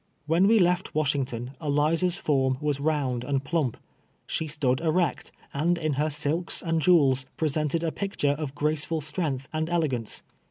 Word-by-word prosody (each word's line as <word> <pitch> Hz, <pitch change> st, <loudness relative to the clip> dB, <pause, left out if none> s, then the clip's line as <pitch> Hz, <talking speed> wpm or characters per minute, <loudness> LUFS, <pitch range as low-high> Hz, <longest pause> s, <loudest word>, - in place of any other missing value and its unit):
When 165 Hz, +5 st, +3 dB
we 225 Hz, +2 st, +5 dB
left 180 Hz, -1 st, +2 dB
AVashington 135 Hz, -5 st, -1 dB
Eliza's 160 Hz, +4 st, +1 dB
form 130 Hz, -3 st, +1 dB
was 145 Hz, -2 st, -1 dB
round 140 Hz, -5 st, 0 dB
and 135 Hz, 0 st, -1 dB
pluni}). 140 Hz, -5 st, 0 dB, 0.5 s
She 160 Hz, -, -2 dB
stood 145 Hz, -4 st, 0 dB
erect, 170 Hz, 0 st, 0 dB, 0.2 s
and 170 Hz, +5 st, +1 dB
in 155 Hz, -3 st, -1 dB
her 150 Hz, +3 st, 0 dB
silks 150 Hz, +3 st, -2 dB
and 165 Hz, -2 st, 0 dB
jewels, 140 Hz, -7 st, +4 dB
]n'esented 155 Hz, +1 st, 0 dB
a 160 Hz, -, 0 dB
picture 195 Hz, -8 st, -1 dB
of 145 Hz, -1 st, -4 dB
graceful 155 Hz, +2 st, +1 dB
strength 145 Hz, -3 st, -3 dB
and 160 Hz, +1 st, -1 dB
elegance. 145 Hz, -10 st, -1 dB
150 Hz, 155 wpm, -26 LUFS, 140-165 Hz, 0.5 s, we